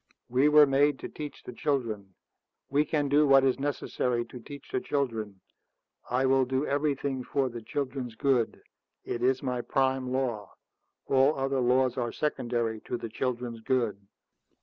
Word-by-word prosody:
"We 130 Hz, +4 st, +4 dB
were 150 Hz, 0 st, +8 dB
made 140 Hz, +1 st, +3 dB
to -, -, -4 dB
teach 150 Hz, -2 st, -8 dB
the 125 Hz, -, -8 dB
children. 110 Hz, -9 st, -2 dB, 0.6 s
We 145 Hz, +2 st, +3 dB
can 150 Hz, -2 st, 0 dB
do 145 Hz, +2 st, +4 dB
what 135 Hz, -1 st, +6 dB
is 135 Hz, 0 st, +2 dB
necessary 125 Hz, -4 st, -1 dB
to 125 Hz, -, -9 dB
teach 140 Hz, +4 st, -11 dB
the 130 Hz, -, 0 dB
children. 110 Hz, -9 st, -2 dB, 0.7 s
I 125 Hz, +2 st, +1 dB
will 135 Hz, 0 st, +4 dB
do 130 Hz, +3 st, -1 dB
everything 140 Hz, -2 st, -1 dB
for 135 Hz, 0 st, 0 dB
the 120 Hz, -1 st, -7 dB
children's 130 Hz, 0 st, -4 dB
good. 125 Hz, -3 st, +1 dB, 0.4 s
It 120 Hz, -, -4 dB
is 130 Hz, +2 st, +2 dB
my 125 Hz, -2 st, -1 dB
prime 130 Hz, -1 st, 0 dB
law. 120 Hz, -6 st, -2 dB, 0.5 s
All 135 Hz, +2 st, +3 dB
other 135 Hz, 0 st, 0 dB
laws 125 Hz, +1 st, +2 dB
are 120 Hz, -2 st, -1 dB
secondary 120 Hz, -6 st, -1 dB
to 125 Hz, -, -2 dB
the 115 Hz, -, -6 dB
children's 120 Hz, -1 st, -3 dB
good." 120 Hz, -4 st, 0 dB
130 Hz, 160 wpm, -28 LUFS, 120-140 Hz, 0.7 s, were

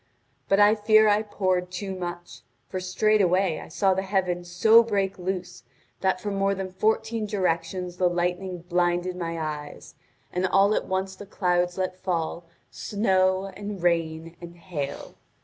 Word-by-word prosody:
But 195 Hz, -, +4 dB
I 205 Hz, +1 st, +7 dB
fear 215 Hz, 0 st, +5 dB
I 210 Hz, 0 st, +4 dB
poured 185 Hz, -4 st, -1 dB
too 190 Hz, +2 st, -5 dB
much, 175 Hz, -6 st, -7 dB, 0.3 s
for 185 Hz, -, -4 dB
straightway 185 Hz, -2 st, +2 dB
I -, -, -9 dB
saw 190 Hz, +4 st, +2 dB
the 190 Hz, -, -1 dB
heavens 180 Hz, -3 st, -1 dB
so 220 Hz, +6 st, +6 dB
break 200 Hz, -4 st, -1 dB
loose 180 Hz, -1 st, -4 dB, 0.4 s
that 190 Hz, -1 st, +1 dB
from 205 Hz, +2 st, -4 dB
more 195 Hz, 0 st, +1 dB
than 190 Hz, -1 st, -5 dB
fourteen 220 Hz, +2 st, 0 dB
directions 180 Hz, -2 st, -2 dB
the 180 Hz, -1 st, +3 dB
lightning 180 Hz, 0 st, -2 dB
blinded 175 Hz, 0 st, +1 dB
my 170 Hz, -2 st, -4 dB
eyes, 150 Hz, -2 st, -6 dB, 0.4 s
and 180 Hz, +1 st, +1 dB
all 195 Hz, +3 st, +4 dB
at -, -, -1 dB
once 190 Hz, 0 st, -2 dB
the 200 Hz, +1 st, -11 dB
clouds 180 Hz, -2 st, 0 dB
let 185 Hz, -1 st, -2 dB
fall 170 Hz, -2 st, -3 dB, 0.3 s
snow 190 Hz, -2 st, +1 dB
and 205 Hz, -2 st, -6 dB
rain 165 Hz, -1 st, 0 dB
and 170 Hz, 0 st, -10 dB
hail. 170 Hz, -6 st, -6 dB
185 Hz, 155 wpm, -26 LUFS, 175-195 Hz, 0.4 s, I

